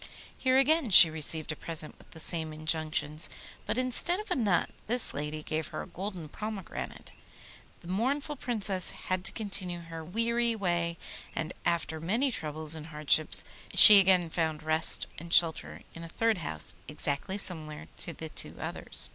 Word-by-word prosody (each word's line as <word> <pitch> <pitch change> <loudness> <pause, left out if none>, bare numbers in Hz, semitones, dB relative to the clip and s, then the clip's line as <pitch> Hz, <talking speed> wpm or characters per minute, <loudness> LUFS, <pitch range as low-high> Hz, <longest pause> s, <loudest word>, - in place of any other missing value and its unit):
Here 260 0 +1
again 285 0 +2
she 175 -4 +11
received 155 0 -1
a - - -5
present 155 0 -3
with - - -20
the 160 - -12
same 160 -1 0
injunctions, 155 -1 -1 0.4
but - - -2
instead 255 +8 +2
of 425 - -9
a - - +1
nut 205 -8 0 0.2
this 245 +2 +1
lady 150 +1 -5
gave 155 0 -4
her - - -7
a - - -12
golden 185 -2 -7
pomegranate. 210 +3 -8 0.7
The - - -14
mournful 270 - -2
Princess 205 -7 -2
had 185 0 -4
to - - +5
continue 190 -5 -3
her 165 -1 -9
weary 230 +6 -1
way, 170 -4 -2 0.4
and 155 -1 -4
after 165 -2 -2
many 230 - 0
troubles 155 -5 -4
and 160 -1 -7
hardships 150 0 +1 0.3
she 210 -1 +12
again 180 -3 +2
found 160 -3 -2
rest 155 +1 +2
and 170 +1 -11
shelter 165 -2 +1
in 165 - -10
a 165 - -10
third 225 +3 0
house 80 - 0
exactly 145 +7 -4
similar 155 -6 -4
to - - -1
the 160 -1 -9
two - - -7
others. 60 - -3
170 Hz, 165 wpm, -28 LUFS, 155-215 Hz, 0.7 s, she